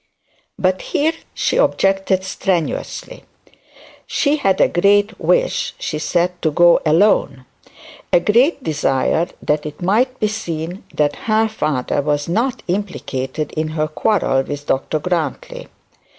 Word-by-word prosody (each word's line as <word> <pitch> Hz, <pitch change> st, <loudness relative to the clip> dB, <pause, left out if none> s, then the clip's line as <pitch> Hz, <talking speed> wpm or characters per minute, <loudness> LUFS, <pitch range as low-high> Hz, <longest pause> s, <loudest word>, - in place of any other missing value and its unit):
But 185 Hz, 0 st, +1 dB
here 310 Hz, +3 st, 0 dB, 0.2 s
she -, -, 0 dB
objected 195 Hz, -, +2 dB
strenuously. 190 Hz, -, -3 dB, 0.8 s
She 295 Hz, 0 st, +1 dB
had 195 Hz, -8 st, +1 dB
a -, -, +5 dB
great 205 Hz, +4 st, +2 dB
wish, -, -, +1 dB
she 155 Hz, -, -4 dB
said, 175 Hz, +3 st, -1 dB
to 160 Hz, -, +2 dB
go 175 Hz, +3 st, +5 dB
alone; 155 Hz, -6 st, +2 dB, 0.7 s
a -, -, +5 dB
great 250 Hz, -, +2 dB
desire 145 Hz, +2 st, 0 dB, 0.2 s
that 150 Hz, 0 st, 0 dB
it 150 Hz, -, -9 dB
might 245 Hz, +8 st, +1 dB
be 215 Hz, -, +2 dB
seen 175 Hz, -4 st, -5 dB
that 145 Hz, -1 st, +1 dB
her 220 Hz, 0 st, +3 dB
father 150 Hz, -11 st, -1 dB
was 145 Hz, 0 st, -1 dB
not 235 Hz, +9 st, -1 dB
implicated 155 Hz, -7 st, -3 dB
in 155 Hz, 0 st, -2 dB
her 155 Hz, 0 st, +1 dB
quarrel 155 Hz, -4 st, +1 dB
with 145 Hz, +1 st, -6 dB
Dr 135 Hz, +3 st, 0 dB
Grantly. 160 Hz, -3 st, -3 dB
175 Hz, 130 wpm, -19 LUFS, 150-210 Hz, 0.8 s, a